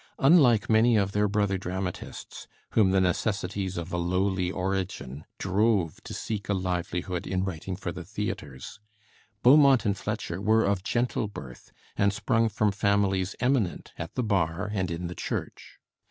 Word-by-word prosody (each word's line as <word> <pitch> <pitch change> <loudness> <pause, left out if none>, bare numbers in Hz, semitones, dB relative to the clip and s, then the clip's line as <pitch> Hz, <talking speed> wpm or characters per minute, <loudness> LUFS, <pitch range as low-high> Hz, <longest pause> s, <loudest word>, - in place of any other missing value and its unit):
Unlike 135 - +5
many 110 +1 +4
of 100 -1 +1
their 105 0 +2
brother 100 -2 0
dramatists, 90 0 -6 0.2
whom 105 -4 +4
the 95 0 +3
necessities 95 0 -1
of 85 +1 -5
a - - 0
lowly 90 +1 0
origin 95 -7 -3
drove 95 -3 +1
to - - -7
seek 105 -3 -4
a 100 - +2
livelihood 90 0 -2
in 95 0 -1
writing 95 0 -4
for 90 -2 -5
the - - -7
theatres, 65 -3 -6 0.6
Beaumont 135 -1 +6
and 100 -2 +2
Fletcher 85 -2 -4
were 110 +2 +3
of 100 -1 +1
gentle 120 0 0
birth, 65 -11 -10 0.2
and 100 0 +3
sprung 115 +2 +1
from 105 0 +1
families 100 -2 +1
eminent 120 -8 0
at 85 0 -7
the 125 - 0
bar 95 -1 0
and 95 -3 -1
in 85 +1 -4
the 85 - -4
Church. - - -5
95 Hz, 155 wpm, -27 LUFS, 90-105 Hz, 0.6 s, Beaumont